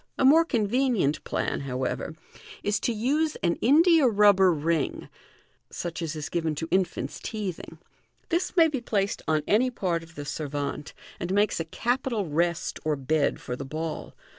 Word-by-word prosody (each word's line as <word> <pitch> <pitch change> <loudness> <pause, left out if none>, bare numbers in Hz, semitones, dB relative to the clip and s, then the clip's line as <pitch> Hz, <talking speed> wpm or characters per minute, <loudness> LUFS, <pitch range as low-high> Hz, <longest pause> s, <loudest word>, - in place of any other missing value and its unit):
A - - +2
more 315 +5 +7
convenient 235 - +1
plan, - - -1
however, 130 +3 -3 0.5
is 205 0 +1
to - - 0
use 290 +8 0
an 170 -1 +3
india 315 +3 +5
rubber 200 -4 +5
ring 160 -1 -1 0.6
(such 170 0 -5
as 165 -1 -3
is 150 -1 -4
given 165 -3 -1
to 160 +2 -4
infanta 190 -1 -1
teething). 195 -7 -5 0.5
This 345 +2 -1
may 330 -1 +7
be 280 -5 -3
placed 205 -3 -1
on 155 -1 +1
any 240 +5 +3
part 180 -8 -1
of 165 0 -15
the 145 - -6
servante, 145 0 -4 0.3
and 175 - -3
makes 205 0 +2
a 165 - -2
capital 240 +3 -1
rest 170 +3 -1
or 155 0 +1
bed 140 +2 0
for 125 - -5
the 140 - -6
ball. 155 +3 -5
180 Hz, 165 wpm, -26 LUFS, 155-240 Hz, 0.6 s, more